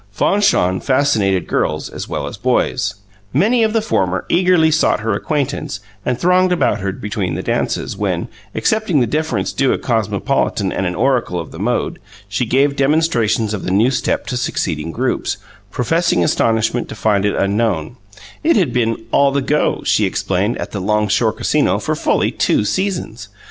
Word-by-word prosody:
Fanchon 100 - +2
fascinated 110 -9 +1
girls 75 0 -1
as - - -7
well - - -3
as 70 - -6
boys. 120 -1 0 0.4
Many 215 - +3
of 220 -1 +2
the 225 -1 +1
former 95 - 0
eagerly 175 -3 +4
sought 155 -7 +2
her 110 0 -1
acquaintance 140 -3 -2 0.2
and 125 - -1
thronged 180 +1 +3
about 175 -10 +1
her 100 0 -2
between 95 -3 -3
the 95 - -4
dances, - - -1
when, - - -2 0.3
accepting 215 -8 +1
the 125 - +3
deference 155 +7 -1
due 135 -1 +2
a - - -1
cosmopolitan 110 -5 0
and 95 - -1
an 90 - -3
oracle 120 -6 +1
of 85 - -7
the 80 - -10
mode, 120 +5 -1 0.3
she 100 +4 -2
gave 140 +4 +2
demonstrations 135 -7 +1
of 105 - -4
the - - -3
new 105 +7 +3
step 130 - -1
to 125 - -3
succeeding 80 -9 -2
groups, - - -1 0.3
professing 165 - +1
astonishment 115 +6 +1
to - - -7
find 105 -2 +1
it 105 - +1
unknown: 100 -2 0 0.5
it 330 +2 +4
had 175 - +2
been 115 -2 0
"all 140 0 +4
the 140 - +1
go," 150 +2 0
she - - +3
explained, 95 +5 -1
at - - -5
the 100 - -4
Long 105 +2 +1
Shore 110 +2 +2
Casino - - +1
for - - -2
fully - - +1
two 105 - +1
seasons. 170 - -2
115 Hz, 175 wpm, -18 LUFS, 100-150 Hz, 0.5 s, eagerly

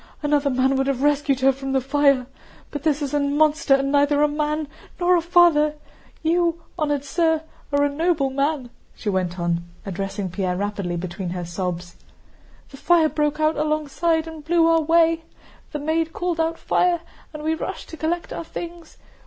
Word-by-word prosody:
Another 290 -1 +2
man 265 +1 +2
would 270 0 +1
have 275 -1 -1
rescued 290 -2 +2
her 270 +1 +5
from 270 0 -5
the 265 - +3
fire. 275 -1 +2 0.5
But 290 - -4
this 300 -1 +1
is 280 0 -4
a 290 - +2
monster 295 0 +3
and 275 0 0
neither 285 +1 +3
a - - +5
man 300 +1 -1 0.3
nor 360 0 +4
a 345 - +2
father! 330 -3 +4 0.5
You, 335 +1 +2 0.2
honored 290 -4 -1
sir, 320 +1 +1 0.3
are 285 0 +3
a - - +4
noble 295 -1 0
man," 275 -2 -1 0.2
she 215 - -4
went 185 -2 -1
on, 170 0 0 0.2
addressing 195 0 -4
Pierre 180 -1 -1
rapidly 200 -3 -2
between 180 +1 -5
her 175 0 -4
sobs. 175 0 -4 0.7
"The 275 - -11
fire 330 +1 +4
broke 300 0 -1
out 310 0 +2
alongside, 310 +2 0
and 320 -2 -9
blew 330 +1 +3
our 330 0 +4
way, 330 +1 +3 0.5
the - - -3
maid 320 +2 -1
called 350 -2 -2
out 325 +1 0
'Fire!' 350 -2 +1 0.3
and 305 -1 -8
we 315 +1 +1
rushed 320 - -5
to 320 - -8
collect 340 +2 -2
our - - -5
things. 340 0 -8
295 Hz, 180 wpm, -23 LUFS, 265-320 Hz, 0.7 s, her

